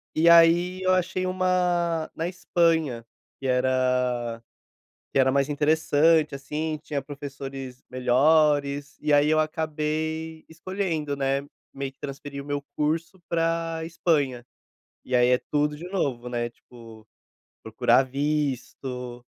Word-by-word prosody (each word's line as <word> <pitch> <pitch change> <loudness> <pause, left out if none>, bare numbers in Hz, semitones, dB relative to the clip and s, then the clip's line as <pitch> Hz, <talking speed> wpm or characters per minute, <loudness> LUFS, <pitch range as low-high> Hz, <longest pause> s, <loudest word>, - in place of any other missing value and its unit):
E 165 +2 +5
aí 170 +2 +5
eu 185 0 +3
achei 185 0 0
uma 180 -3 0
na 165 - -2
Espanha 165 -8 0 0.3
que 135 - -4
era 125 -2 +1 0.7
que - - +1
era 130 0 +4
mais 140 0 +2
interessante, 155 +1 +3
assim, 150 +2 -3
tinha 145 -3 -3
professores 135 -2 -8
melhores 140 +3 +2
e 150 0 +1
aí 145 +1 +5
eu 155 - +3
acabei 155 +1 -2
escolhendo, 165 -4 -3
né, 135 0 0 0.3
meio 135 0 -5
que 135 - -42
transferir 140 0 -7
o - - -14
meu 145 -1 -3
curso 165 +5 -2
pra 165 -1 0
Espanha. 145 -7 0 0.6
E 130 - -4
aí 125 0 +5
é 125 - +4
tudo 150 0 +1
de 175 +4 -8
novo, 130 -10 -2
né, 120 -1 -2
tipo, 115 -2 -15 0.6
procurar 130 - +3
visto, 130 -3 -3
150 Hz, 125 wpm, -25 LUFS, 135-165 Hz, 0.7 s, E